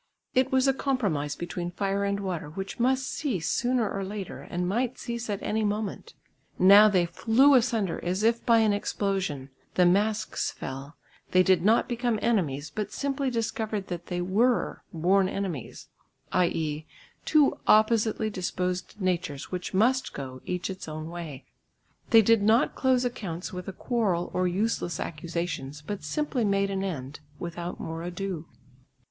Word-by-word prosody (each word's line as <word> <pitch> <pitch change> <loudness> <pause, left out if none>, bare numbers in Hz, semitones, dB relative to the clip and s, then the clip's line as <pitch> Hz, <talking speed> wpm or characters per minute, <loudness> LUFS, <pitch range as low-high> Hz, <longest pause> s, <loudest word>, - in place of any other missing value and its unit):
It 260 +1 +2
was 260 0 +3
a 270 - +4
compromise 200 - -1
between 175 0 -4
fire 195 +2 -1
and 200 0 -1
water 180 -6 -3
which 195 +8 -6
must 260 +2 +2
cease 230 - -2
sooner 245 -2 +1
or 195 0 -3
later 195 -1 -6
and 175 0 -3
might 240 +6 0
cease 235 -2 -5
at 200 -1 -3
any 220 +1 0
moment. 210 0 -3 0.4
Now 200 +3 +8
they 185 -4 +3
flew 230 +11 +4
asunder 225 -7 +2
as 185 +4 -1
if 230 +1 +2
by 230 -1 +5
an 215 -2 +3
explosion; 195 -9 -2 0.2
the 180 - +5
masks 210 +4 +1
fell; 135 +3 -7 0.4
they 185 0 +6
did 185 -2 +3
not 225 +4 +4
become 240 -2 0
enemies, 155 - 0
but 210 -1 -3
simply 275 -1 -1
discovered 220 -3 -2
that 175 -1 -5
they 175 0 -2
were 225 +7 +1
born 185 +3 +2
enemies, 190 - -5 0.4
i.e. 160 -4 0 0.4
two 300 -3 +3
oppositely 220 0 +3
disposed 180 +1 -3
natures 180 -6 -2
which 180 0 -4
must 245 +7 +2
go, 130 -2 -7
each 180 0 -2
its 190 - -8
own 155 +1 -6
way. 160 -6 -7 0.6
They 225 -1 +7
did 230 0 +4
not 220 +4 +3
close 255 -1 +2
accounts 190 -9 -4
with 180 0 -6
a - - -3
quarrel 195 -5 -1
or 185 0 +1
useless 180 -2 -1
accusations, 155 -3 -4
but 195 +2 -5
simply 265 - -1
made 200 -1 +1
an 195 0 -1
end 150 -7 -5 0.2
without 170 +1 -5
more 165 0 -5
ado. 175 -1 -4
195 Hz, 155 wpm, -27 LUFS, 175-225 Hz, 0.6 s, Now